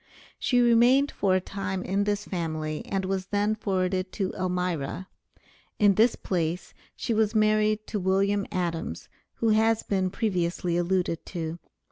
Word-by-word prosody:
She 245 - +2
remained 245 +4 +5
for 190 -2 +1
a - - +3
time 190 0 -4
in 200 +2 0
this 205 0 -1
family, 155 -3 -3
and 195 -1 -1
was 190 0 -2
then 205 +1 +1
forwarded 185 -3 -1
to 195 -3 -2
Elmira. 180 -2 -2 0.7
In 205 -1 +5
this 225 +4 +4
place 175 -1 -2 0.2
she 235 - -2
was 220 0 +1
married 215 0 +2
to 210 - -3
William 195 +2 +1
Adams, 175 -4 -3 0.3
who 230 - 0
has 220 +1 +3
been 190 -2 0
previously 180 -4 -1
alluded 175 -1 0
to. 165 -1 -4
190 Hz, 145 wpm, -27 LUFS, 180-215 Hz, 0.7 s, remained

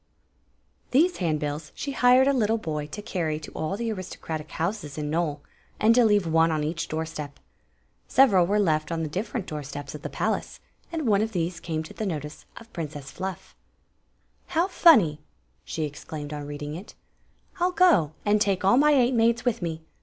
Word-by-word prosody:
These 330 +8 +3
handbills 150 -3 -2
she 280 - -4
hired 255 0 +5
a 280 - +4
little 225 -3 +2
boy 150 -7 -4
to 205 +8 -8
carry 160 -6 -2
to 155 - -10
all 160 +6 -3
the 230 0 -2
aristocratic 170 -5 -6
houses 165 -4 -3
in 150 -1 -3
Nole, 155 -3 -1 0.4
and 220 +2 +5
to 245 +1 +5
leave 205 -4 +3
one 165 0 +3
on 155 -1 0
each 165 +2 -2
door 160 +1 -2
step. 150 -3 -7 0.7
Several 200 -10 +5
were 205 +2 +2
left 155 -6 +1
on 165 -1 -1
the - - -2
different 200 +6 -3
door 150 -1 -5
steps 145 0 -7
of 150 - -8
the - - -5
palace, - - -2 0.3
and 325 -3 -3
one 205 -2 +4
of 225 +1 -2
these 170 -1 -2
came 160 -2 -3
to - - -11
the 215 - -3
notice 150 -3 -5
of 230 - -13
Princess 150 -5 -6
FluF 190 -1 -6 0.5
" - - -42
How 340 +3 +3
funny! 225 - +5 0.2
" - - -42
she 155 -2 -3
excla 150 +1 -8
med 145 +1 -7
on 145 -1 -5
reading 145 0 -6
it. 180 +6 -9 0.3
" - - -28
I 350 - +3
'11 360 0 -1
go, 210 - +5
and 210 0 +3
take 195 -2 +1
all 240 +6 +5
my 300 +2 +5
eight 255 -2 +3
maids 235 +1 +2
with 245 -5 0
me. 160 -2 -4
175 Hz, 205 wpm, -26 LUFS, 155-225 Hz, 0.7 s, hired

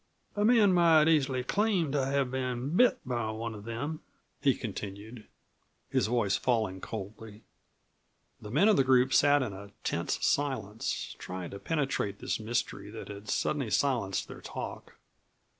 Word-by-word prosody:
"A 205 - +1
man 215 -4 +5
might 165 -3 +5
easily 135 -5 +2
claim 195 - +1
to 140 -1 +1
have 135 -1 0
been 130 +3 -2
bit 250 +5 +5
by 120 -3 -2
one 110 +1 -4
of 105 -1 -10
them," 145 +7 -4 0.4
he 135 -3 +3
continued, 105 +1 -7 0.6
his - - +2
voice 110 -4 +1
falling 110 -7 0
coldly. 105 +2 -8 1.0
The 105 - -8
men 150 - +4
of 215 - +5
the 135 - +5
group 130 0 +4
sat 145 +1 +5
in 110 -6 -4
a 100 +1 -9
tense - - -1
silence, 115 -7 -1
trying 90 -1 -6
to 100 - -7
penetrate 135 -10 -1
this - - -2
mystery 110 +2 -3
that - - -8
had 100 +1 -9
suddenly 140 -6 0
silenced 105 -3 0
their - - -10
talk. - - -7
125 Hz, 155 wpm, -30 LUFS, 105-145 Hz, 1.0 s, man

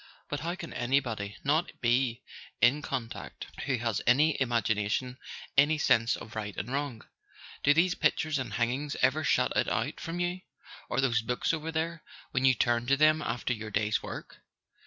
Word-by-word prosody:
But 145 - -2
how 170 +3 -3
can 170 -3 -8
anybody 120 -5 -1
not 155 +5 0
be 120 0 +1 0.4
in 130 +5 +4
con¬ 115 -4 -3
tact, - - -8 0.2
who 130 -2 +1
has 115 -3 -1
any 150 +6 +5
imagination, 115 +1 0 0.4
any 145 +3 +5
sense 115 -5 +3
of 110 - -10
right 105 -2 -4
and 125 - -4
wrong? 140 -5 -3 0.6
Do 145 - +5
these 180 +3 +4
pictures 155 -4 +1
and 130 - -4
hangings 130 +5 -1
ever 140 +4 +3
shut 140 - +2
it - - +2
out - - -1
from 165 +2 -5
you—or 175 -5 -4
those 120 -3 +2
books 125 +7 -1
over 160 0 -3
there, 165 +1 -2 0.3
when 130 0 +1
you 130 -1 +6
turn 120 +1 +1
to 140 +1 +4
them 155 +1 +5
after 125 -2 -1
your 110 -2 -6
day's 105 +1 0
work? - - -8
130 Hz, 175 wpm, -29 LUFS, 120-155 Hz, 0.6 s, you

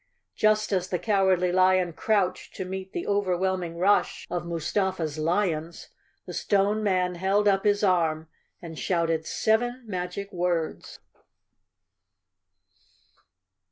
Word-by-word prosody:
Just 215 0 +2
as 185 -1 0
the 180 - 0
Cowardly 190 -3 +2
Lion 185 -1 +3
crouched 190 0 -1
to 190 - -4
meet 190 +1 -6
the 345 - -4
overwhelming 185 -3 -1
rush 195 +4 +2
of 175 -1 -3
Mustafa's 170 -1 -2
lions, 165 -1 -1 0.4
the - - -8
Stone 205 +1 +1
Man 185 -3 +1
held 195 +4 +1
up 195 0 +2
his 205 0 +2
arm 165 -4 +1 0.4
and 165 -2 -8
shouted 165 -3 0
seven 240 +3 0
magic 190 0 -5
words! 175 -2 -2
185 Hz, 115 wpm, -26 LUFS, 170-200 Hz, 0.4 s, Lion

